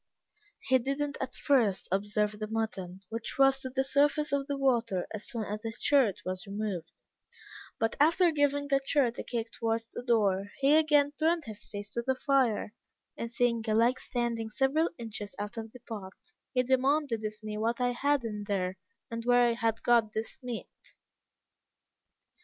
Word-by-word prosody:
"He 260 -1 +3
did 275 +3 -2
not 290 -1 -2
at 260 -1 -3
first 230 -9 +2
observe 210 +2 0
the 215 - -3
mutton, 195 -5 -3
which 230 +1 -5
rose 270 0 +5
to 260 - -4
the 265 +1 0
surface 290 +2 +2
of 280 -1 0
the 280 - -2
water 235 -9 +1
as 215 -1 -5
soon 235 -4 -3
as 210 +1 -4
the 225 - -3
shirt 230 -8 +2
was 185 +2 -4
removed; 195 -5 -4 0.9
but, 225 -1 0
after 335 +4 +5
giving 285 -1 +1
the 275 -1 +2
shirt 265 -4 +1
a - - -3
kick 230 -2 -3
towards 225 0 -2
the - - -5
door, 205 -5 +2
he 275 +2 +5
again 295 -2 +4
turned 325 0 +2
his 215 -3 -8
face 205 0 -6
to 235 - -2
the 260 +2 0
fire, 255 -6 +1 0.4
and 230 0 -5
seeing 235 -1 +1
a 215 - +2
leg 240 +3 +3
standing 235 -2 -2
several 275 +8 +2
inches 220 -3 -6
out 205 0 -5
of 225 -1 -6
the 250 - -12
pot, 205 -5 -7 0.4
he 250 - +2
demanded 260 -2 +1
of 215 0 -3
me 210 0 -4
what 230 +2 0
I 250 0 +2
had 280 +2 +1
in 210 -2 -4
there 190 -2 -2 0.3
and 230 0 -4
where 245 0 +5
I - - +1
had 225 -1 -1
got 230 -3 +3
this 220 +1 -4
meat! 250 - -8
235 Hz, 180 wpm, -30 LUFS, 215-275 Hz, 0.9 s, rose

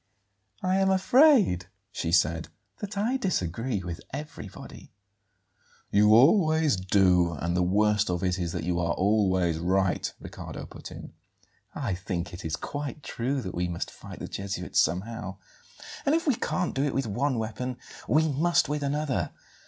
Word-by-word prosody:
"I 185 +1 +2
am 195 0 +3
afraid," 195 - +5 0.2
she 80 - -3
said; 80 -1 +2 0.3
"that 205 -1 -6
I 230 +6 +1
disagree 115 - -1
with 85 -2 -6
everybody." 150 +3 -9 1.0
"You 105 +1 +6
always 155 - +5
do, 90 -2 +3
and 85 +3 -2
the 90 - +2
worst 105 +3 +2
of 90 +1 -1
it 90 0 0
is 85 -2 -2
that - - -3
you 85 0 0
are 85 -2 +1
always 95 -5 +2
right," 95 +2 +1
Riccardo - - -8
put - - -10
in. - - -10 0.6
"I 120 -9 -2
think 90 -1 -4
it 85 - -8
is 80 -2 -2
quite 145 - -5
true 130 +3 -2
that 95 - -5
we 90 +1 -1
must 85 -1 -4
fight - - -11
the - - -6
Jesuits 100 0 -2
somehow; 95 +1 -1 0.7
and 285 - +3
if 330 - 0
we 285 - +4
can't 180 -5 -1
do 135 - 0
it 145 - -1
with 135 - 0
one 125 +5 0
weapon 115 +3 -3 0.3
we 155 +6 +3
must 160 +4 +2
with 150 +1 -2
another. 145 -1 -1
105 Hz, 160 wpm, -27 LUFS, 90-150 Hz, 1.0 s, You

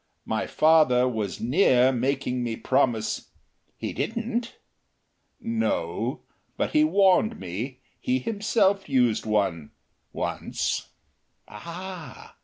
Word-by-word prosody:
My - - -2
father 155 -6 +4
was 110 -6 -3
near 130 - +4
making 125 0 -1
me 115 -2 -2
promise 120 -3 0 0.2
" - - -45
"He - - -4
didn't?" 230 - -3 0.8
"No. 230 0 -2 0.4
But - - -1
he 305 -1 +4
warned 200 -6 +3
me. 110 +9 -5 0.2
He 125 - 0
himself 200 - +1
used 125 -5 +2
one 95 -8 0 0.4
once." - - -2 0.6
"Ah!... 170 - -9
135 Hz, 100 wpm, -26 LUFS, 120-195 Hz, 0.8 s, father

